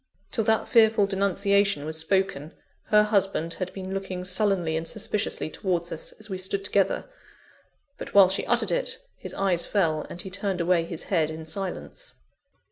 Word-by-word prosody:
Till 225 - +1
that 220 0 +2
fearful 220 -3 +5
denunciation 200 -3 +1
was 155 +1 -4
spoken, 165 -3 0 0.3
her 210 0 +5
husband 195 -6 +1
had 185 +1 -4
been 190 0 -6
looking 190 -2 -4
sullenly 185 -3 +1
and 160 +1 -3
suspiciously 215 -4 -2
towards 175 -2 -2
us, 160 - -6
as 215 - -7
we 190 -3 -4
stood 195 +1 -2
together; 200 - +1 0.9
but - - -8
while 195 -2 +9
she 190 +2 0
uttered - - +3
it, - - 0 0.2
his - - -8
eyes 180 -3 +1
fell, 160 -7 0
and 175 - -6
he 190 - -8
turned 195 0 -2
away 170 -1 +2
his 165 -1 -6
head 165 -5 +1
in 160 0 -7
silence. 195 - -6
190 Hz, 170 wpm, -26 LUFS, 170-200 Hz, 0.9 s, while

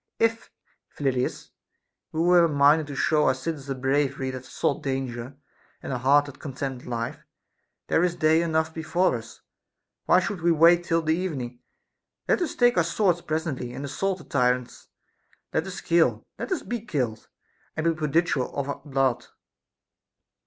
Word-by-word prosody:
If, 230 0 0 0.4
Phyllidas, 130 -3 -2 0.6
we 160 - -1
were 175 0 +5
minded 145 +1 +4
to 145 - -6
show 150 +2 +2
our - - +3
citizens 140 +1 -5
a 135 - -1
bravery 135 0 0
that 130 0 -8
sought 140 - -1
danger, 130 -1 -4 0.5
and - - -4
a 125 - -2
heart 140 +3 +4
that 140 -1 -11
contemned 135 -2 -5
life, 115 -1 -3 0.7
there 165 - +2
is 175 -1 +1
day 160 -1 +3
enough 160 -1 0
before 165 +1 +1
us; 115 0 -9 0.7
why 180 - +6
should 185 -1 -3
we 170 +1 +3
wait 170 +2 +5
till 165 -1 +1
the 160 0 +2
evening 135 -10 -4 0.4
\ - - -57
Let - - +2
us 345 - -2
take 245 -4 +4
our 175 - +5
swords 175 0 +1
pres 160 +1 -2
ently, 130 -5 -4
and 140 - -5
assault 190 +7 -1
the - - -12
tyrants. 125 -2 -1 0.7
Let 160 - 0
us 190 0 -6
kill, 170 -1 +2
let - - -5
us 370 - -1
be 240 -2 -4
killed, 125 - -3 0.5
and 160 - -1
be 165 0 +3
prodigal 155 -3 0
of 140 0 -2
our 140 - -4
blood. 135 -4 0
150 Hz, 170 wpm, -25 LUFS, 130-170 Hz, 0.7 s, why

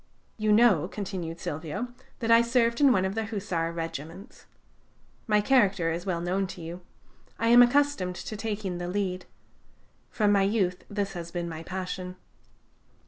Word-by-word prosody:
"You 215 -1 0
know," 210 -7 +5
continued 185 -5 -5
Silvio, 160 +11 -4 0.3
"that 230 0 +1
I 230 0 +8
served 235 +1 +1
in 280 -2 +7
one 190 -6 +2
of 190 - -2
the 225 +1 -2
Hussar 190 -6 -2
regiments. 165 - -7 0.8
My 210 -1 +3
character 200 -9 +3
is 175 +3 -4
well 175 -3 0
known 185 +2 0
to 180 - -9
you: 170 +2 -7 0.6
I 230 - +1
am 240 +1 +9
accustomed 245 -7 +3
to 215 - -6
taking 205 -4 -3
the 175 - -4
lead. 185 -1 -2 0.8
From 210 -2 +2
my 200 -1 +4
youth 195 -3 0
this 200 -1 -2
has 170 -2 -6
been 175 0 -4
my 160 -1 -6
passion. 185 +1 -5
195 Hz, 160 wpm, -27 LUFS, 175-220 Hz, 0.8 s, am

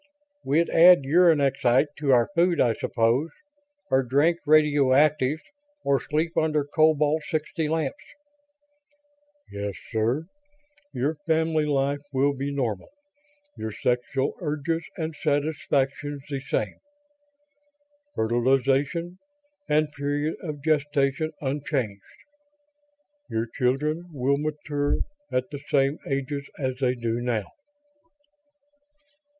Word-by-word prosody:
"We'd 160 +5 +2
add 175 -2 +7
uranexite 145 -3 +3
to 145 -2 +1
our 120 -2 +4
food, 175 -1 +2
I 120 -2 +4
suppose. 115 +8 0 0.6
Or 130 0 +4
drink 145 +7 +2
radioactives, 150 -1 +3 0.4
or 140 -1 +2
sleep 160 +3 -2
under 155 -2 +1
cobalt 155 0 +2
60 155 -1 -2
lamps." 155 -4 -2 1.5
"Yes, 100 -1 -4 0.2
sir. 120 +7 0 0.7
Your 145 +5 -1
family 160 -1 +2
life 140 0 0
will 140 +1 +2
be 140 +1 -3
normal; 120 -8 -2 0.7
your 110 - -5
sexual 125 +5 -1
urges 165 +1 -2
and 160 -1 -3
satisfactions 145 -1 -1
the 140 -2 -3
same. 120 -6 -3 1.4
Fertilization 135 +9 +1 0.5
and 150 0 +2
period 145 +2 -2
of 150 -4 -6
gestation 150 -1 +1
unchanged. 135 -7 -2 1.3
Your 110 +1 -1
children 150 +8 -1
will 140 -1 +1
mature 145 -1 -1 0.3
at 125 0 -1
the 145 - -6
same 140 +1 +2
ages 140 +1 -3
as 130 -2 -2
they 130 -2 +1
do 115 -1 -2
now." 115 -4 -1
145 Hz, 100 wpm, -25 LUFS, 130-155 Hz, 1.5 s, add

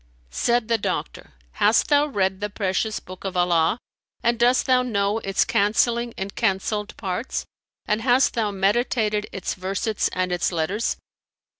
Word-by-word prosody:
Said 240 - +1
the 230 -1 +1
doctor, 195 - -4 0.3
"Hast 210 +2 +4
thou 290 0 +4
read 190 -7 -1
the 210 - -2
precious 205 +1 -1
book 185 0 -12
of 190 -2 -3
Allah 175 +1 +3 0.5
and 235 0 +1
dost 245 +2 +3
thou 255 -1 +4
know 210 -3 0
its 195 -2 +1
cancelling 235 +3 +1
and 195 +1 -4
cancelled 210 0 -1
parts 195 +5 -3 0.4
and 210 +1 0
hast 255 +2 +3
thou 225 -3 0
meditated 210 +1 0
its 195 - -3
versets 195 +3 -1
and 185 0 -1
its 180 +1 0
letters?" 175 +6 -1
210 Hz, 150 wpm, -23 LUFS, 190-235 Hz, 0.5 s, Hast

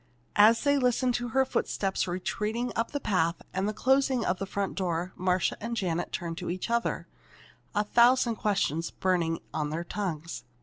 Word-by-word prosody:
As 220 +3 +6
they 285 0 +3
listened 250 0 +2
to 240 0 -1
her 265 +3 +2
footsteps 195 -6 -1
retreating 210 +7 -2
up 230 0 0
the 285 - -3
path 170 -8 +1
and 190 +2 0
the - - 0
closing 260 +1 +2
of 180 - 0
the 195 - -3
front 200 0 -2
door 180 -1 -2
Marcia 185 0 +1
and 230 +2 -3
Janet 175 -4 -1
turned 170 -1 -4
to - - -4
each 185 +6 -3
other, 235 0 0 0.7
a 210 - +3
thousand 235 +1 +4
questions 170 -6 0
burning 170 -3 0
on 150 -1 -1
their 160 +3 -3
tongues. 170 -4 -4
200 Hz, 175 wpm, -28 LUFS, 175-235 Hz, 0.7 s, As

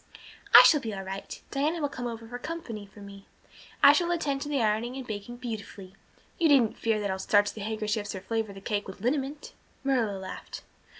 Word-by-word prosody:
"I - - +13
shall 300 - +6
be 220 -5 -5
all 195 - -5
right. 190 +1 -7
Diana 300 +5 0
will 290 - 0
come 250 -3 -5
over 230 -1 -7
for 245 +2 -7
company 245 -10 -6
for 205 +1 -15
me. 200 0 -12 0.6
I - - +10
shall 345 -1 +1
attend 290 -6 -1
to 290 - -4
the 285 -2 0
ironing 225 +2 0
and 265 - -6
baking 215 +2 -6
beautifully 210 -5 -7 0.5
you 335 - +4
needn't 255 -7 +4
fear 225 -2 +1
that 200 -2 -1
I'll 190 - -3
starch 205 +1 +3
the 215 - -8
handkerchiefs 215 -1 -2
or 190 - -6
flavor 220 +1 -2
the 195 0 -11
cake 205 0 -2
with 190 0 -9
liniment." 275 +4 -2 0.3
Marilla 240 -7 +1
laughed. 190 0 -8
225 Hz, 205 wpm, -28 LUFS, 205-270 Hz, 0.6 s, I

